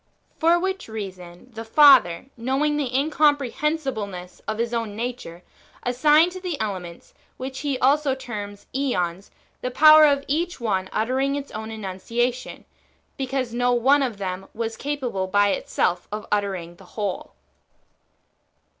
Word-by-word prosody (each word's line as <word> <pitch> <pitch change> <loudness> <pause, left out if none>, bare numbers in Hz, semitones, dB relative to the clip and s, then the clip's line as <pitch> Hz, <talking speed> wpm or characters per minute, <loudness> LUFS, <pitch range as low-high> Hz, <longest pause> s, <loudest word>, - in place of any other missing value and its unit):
For 335 +2 +4
which 380 +2 -3
reason 190 -1 -8
the 225 0 -6
Father, 250 - +6
knowing 270 +5 0
the 285 -4 -2
incomprehensibleness 275 - 0
of 215 - -2
His 235 +1 -2
own 225 -3 -2
nature, 225 -7 -5 0.4
as 245 0 -1
signed 305 +6 +5
to 370 - -7
the 355 -6 -4
elements, 185 -5 -5 0.2
which 260 +1 -6
He 285 -3 -1
also 275 +1 +2
terms 205 -6 -7
^ons, 195 -9 -1 0.3
[the 250 - -2
power] 310 +3 +8
of 280 -1 +1
each 335 +4 -1
one 190 -5 -1
uttering 260 +5 0
its 285 -1 -6
own 220 +1 -6
enunciation, 225 +4 -3 0.5
because 265 -3 -3
no 245 +1 +2
one 270 +4 +4
of 245 -6 -2
them 190 -1 -5
w^as 225 -1 -2
capable 250 -9 -3
by 205 +1 +3
itself 180 -2 -1
of 210 0 -5
uttering 190 -5 -2
the 195 - -16
whole. 205 -3 -3
240 Hz, 140 wpm, -23 LUFS, 205-280 Hz, 0.5 s, power